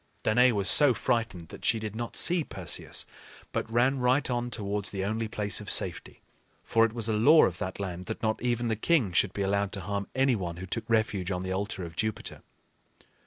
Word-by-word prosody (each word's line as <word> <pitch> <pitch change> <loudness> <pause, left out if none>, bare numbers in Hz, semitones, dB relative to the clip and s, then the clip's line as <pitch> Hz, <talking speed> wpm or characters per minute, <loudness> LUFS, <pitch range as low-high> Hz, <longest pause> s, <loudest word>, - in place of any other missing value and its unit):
Danaë 125 +3 +4
was 100 -2 0
so 145 -5 +7
frightened 110 -10 -2
that - - -11
she - - +2
did 110 -1 -5
not 120 +1 -5
see 175 -1 +3
Perseus, - - -3 0.5
but 115 - -3
ran 130 +4 +2
right 125 +3 +2
on 120 0 -1
towards 100 -3 -3
the 95 -1 -3
only 110 +2 -2
place 105 -2 0
of - - -7
safety. - - 0 0.4
For 115 - +2
it 110 - -3
was 115 -2 -2
a 110 - 0
law 145 +10 +6
of 90 -1 -3
that 95 +1 -5
land 90 -2 -5
that 110 - -6
not 110 0 0
even 120 0 0
the 110 - 0
king 120 - +1
should 90 +2 +2
be 100 - -3
allowed 100 0 0
to 95 - -4
harm 100 +1 -3
any 135 -1 +3
one 85 -5 -4
who 95 - -6
took 115 +4 -5
refuge 110 -5 0
on 90 -1 -2
the 95 0 -3
altar 95 -1 -3
of 80 -1 -10
Jupiter. 110 +3 -3
110 Hz, 215 wpm, -28 LUFS, 100-120 Hz, 0.5 s, so